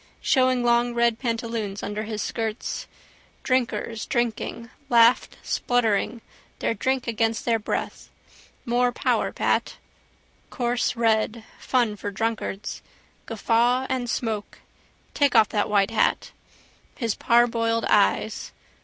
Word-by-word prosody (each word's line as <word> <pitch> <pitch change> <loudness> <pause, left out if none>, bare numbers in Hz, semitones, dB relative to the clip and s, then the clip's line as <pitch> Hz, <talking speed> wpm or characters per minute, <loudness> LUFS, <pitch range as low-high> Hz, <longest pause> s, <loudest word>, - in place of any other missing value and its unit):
Showing 255 -1 +3
long 240 0 +2
red 235 -1 +2
pantaloons 230 -4 -3
under 210 +1 -3
his 215 -1 -3
skirts. 225 -1 -4 0.6
Drinkers, 235 -3 -1
drinking, 230 -1 -2 0.2
laughed 235 0 +4
spluttering, 235 -1 0 0.4
their - - 0
drink 260 +4 -1
against 225 -1 -1
their 230 -2 +2
breath. 210 - -4 0.6
More 245 +1 +2
power, - - 0
Pat. - - 0 0.7
Coarse 245 0 -1
red: 225 -1 +1 0.2
fun 240 -5 +1
for 205 - -4
drunkards: 215 -1 -3 0.5
guffaw 235 +3 +1
and 250 -2 -1
smoke. 220 -4 -3 0.6
Take 285 -3 +2
off 215 - +6
that 205 -1 0
white 200 0 +2
hat. 225 - +1 0.6
His 230 -5 -1
parboiled 230 0 +2
eyes. - - +1
230 Hz, 110 wpm, -24 LUFS, 220-245 Hz, 0.7 s, off